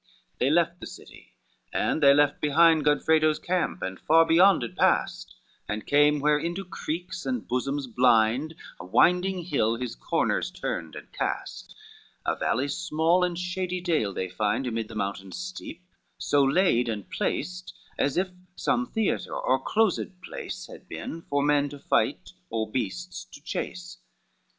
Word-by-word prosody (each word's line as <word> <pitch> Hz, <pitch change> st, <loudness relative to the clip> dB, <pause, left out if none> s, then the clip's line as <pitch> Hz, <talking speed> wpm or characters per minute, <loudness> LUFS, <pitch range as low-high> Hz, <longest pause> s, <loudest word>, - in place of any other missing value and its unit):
VII -, -, -34 dB
They 130 Hz, -, +2 dB
left 170 Hz, +2 st, +2 dB
the -, -, -7 dB
city, -, -, -14 dB, 0.4 s
and 160 Hz, -, 0 dB
they 140 Hz, -1 st, +8 dB
left 145 Hz, 0 st, +3 dB
behind 160 Hz, +1 st, +5 dB
Godfredo's 155 Hz, +1 st, +3 dB
camp, 180 Hz, +2 st, -2 dB
and 95 Hz, 0 st, -4 dB
far 165 Hz, +1 st, +5 dB
beyond 175 Hz, -1 st, +5 dB
it 120 Hz, -, -6 dB
passed, -, -, +1 dB, 0.3 s
And 105 Hz, +1 st, -3 dB
came 145 Hz, +1 st, +4 dB
where 150 Hz, +1 st, +3 dB
into 175 Hz, +5 st, -3 dB
creeks 180 Hz, +1 st, -5 dB
and 250 Hz, -2 st, -3 dB
bosoms 135 Hz, +3 st, -1 dB
blind 125 Hz, +4 st, +2 dB, 0.2 s
A -, -, -8 dB
winding 180 Hz, -, +3 dB
hill 125 Hz, -9 st, +1 dB
his 125 Hz, 0 st, -4 dB
corners -, -, -1 dB
turned 80 Hz, -2 st, -5 dB
and -, -, -10 dB
cast, -, -, -4 dB, 0.5 s
A -, -, +1 dB
valley 135 Hz, +2 st, 0 dB
small 170 Hz, +2 st, +1 dB
and 175 Hz, -1 st, -1 dB
shady 180 Hz, 0 st, -3 dB
dale 165 Hz, -, 0 dB
they 95 Hz, -1 st, -3 dB
find 105 Hz, +7 st, -1 dB
Amid 115 Hz, -3 st, -2 dB
the 115 Hz, -, -11 dB
mountains 100 Hz, -2 st, -4 dB
steep 180 Hz, -1 st, -7 dB, 0.3 s
so 145 Hz, -, +2 dB
laid 135 Hz, -5 st, +3 dB
and 105 Hz, -4 st, -4 dB
placed 180 Hz, 0 st, -3 dB, 0.3 s
As 140 Hz, +2 st, +1 dB
if 185 Hz, +1 st, +1 dB, 0.3 s
some 245 Hz, +1 st, 0 dB
theatre 220 Hz, -4 st, -1 dB
or 130 Hz, -, +1 dB
closed 190 Hz, +2 st, 0 dB
place -, -, -7 dB
Had -, -, -13 dB
been 165 Hz, -, -6 dB
for 140 Hz, 0 st, +1 dB
men 145 Hz, -1 st, +2 dB
to 145 Hz, -, -9 dB
fight -, -, 0 dB, 0.2 s
or 110 Hz, -1 st, -2 dB
beasts 175 Hz, -, -4 dB
to 190 Hz, -, -14 dB
chase. 180 Hz, +4 st, -6 dB
150 Hz, 160 wpm, -26 LUFS, 125-180 Hz, 0.5 s, they